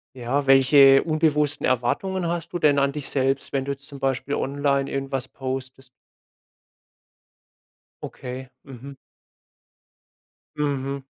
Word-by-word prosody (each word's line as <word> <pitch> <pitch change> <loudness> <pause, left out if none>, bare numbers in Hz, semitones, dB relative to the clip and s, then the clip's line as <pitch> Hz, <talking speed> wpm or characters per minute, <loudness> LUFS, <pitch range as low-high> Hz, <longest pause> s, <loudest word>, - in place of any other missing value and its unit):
Ja, 130 +3 -2
welche 135 0 +6
unbewussten 155 -2 0
Erwartungen 170 +9 -1
hast 170 0 -3
du 175 - -2
denn 150 -3 +3
an 140 0 +2
dich 145 -1 -2
selbst, 135 0 -1
wenn 135 -1 -1
du 140 - -2
jetzt 140 0 -8
zum 140 -2 -11
Beispiel 135 +1 -1
online 140 0 0
irgendwas 135 -1 -3
postest? 130 -1 -6 2.1
Okay. 130 +1 -7 0.2
Mhm. 135 +1 -10 1.6
Mhm. 140 -2 -2
140 Hz, 115 wpm, -23 LUFS, 135-145 Hz, 2.1 s, welche